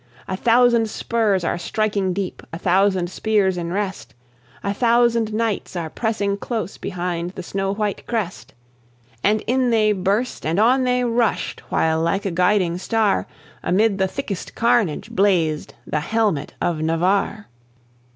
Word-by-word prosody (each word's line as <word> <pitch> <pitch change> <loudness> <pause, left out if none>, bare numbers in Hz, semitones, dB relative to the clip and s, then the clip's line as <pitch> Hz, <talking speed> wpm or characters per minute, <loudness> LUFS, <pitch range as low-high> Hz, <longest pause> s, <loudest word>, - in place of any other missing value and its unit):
A 190 - -2
thousand 235 +1 +4
spurs 215 -5 0
are 170 - -1
striking 200 +1 0
deep, 185 0 -4
a 165 - -5
thousand 185 0 +2
spears 205 -3 +1
in 170 -1 -4
rest, 190 - -4 0.5
A 200 - -1
thousand 235 0 +2
knights 215 -3 -2
are 165 -3 -3
pressing 205 -3 -1
close 215 -3 -4
behind 175 -2 -3
the 185 - -6
snow 195 +2 -2
white 210 -1 -3
crest; 215 -6 -4 0.7
And 210 +1 +3
in 250 +2 +1
they 215 -2 +3
burst, 205 +5 -1
and 165 +5 0
on 255 +4 +4
they 250 0 +2
rushed, 235 -2 0
while 160 0 +1
like 180 +5 0
a 195 - 0
guiding 180 0 +2
star, 205 - +1 0.3
Amid 200 +3 +2
the 190 - +2
thickest 200 -4 -5
carnage 230 -9 +1
blazed 175 -6 +1
the 150 - -1
helmet 205 -4 -1
of 165 -3 -1
Navarre. 185 +6 0
200 Hz, 145 wpm, -21 LUFS, 180-225 Hz, 0.7 s, thousand